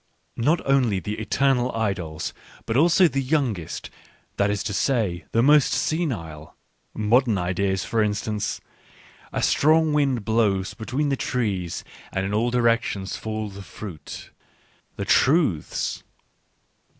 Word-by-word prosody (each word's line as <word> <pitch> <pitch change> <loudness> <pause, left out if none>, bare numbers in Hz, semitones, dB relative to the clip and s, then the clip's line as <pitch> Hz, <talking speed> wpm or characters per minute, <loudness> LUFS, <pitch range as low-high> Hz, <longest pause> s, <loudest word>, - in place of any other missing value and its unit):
Not 155 +8 +2
only 125 -8 +2
the 105 +3 -5
eternal 125 +3 +1
idols, 95 -8 -2 0.3
but 115 - -2
also 170 +5 +5
the 135 -2 -1
youngest 130 - -2 0.2
— - - -36
that 100 0 +2
is 105 0 -1
to 105 -1 -3
say, 105 -7 0
the 115 - +3
most 150 0 +5
senile: 85 - -2 0.4
modern 115 +1 +3
ideas, 95 +1 -1
for 115 - 0
instance. 105 0 -1 0.7
A - - -2
strong 155 +1 +3
wind 135 -7 +1
blows 105 -4 +1
between 130 +6 -2
the 135 - +1
trees 100 -10 -2 0.3
and 95 0 -1
in 100 - -3
all 115 +3 +2
directions 115 -5 +1
fall 110 -1 -4
the 100 +1 -9
fruit 90 -6 -9 0.3
— - - -37
the - - -3
truths. 135 - +2
110 Hz, 135 wpm, -24 LUFS, 100-135 Hz, 0.7 s, also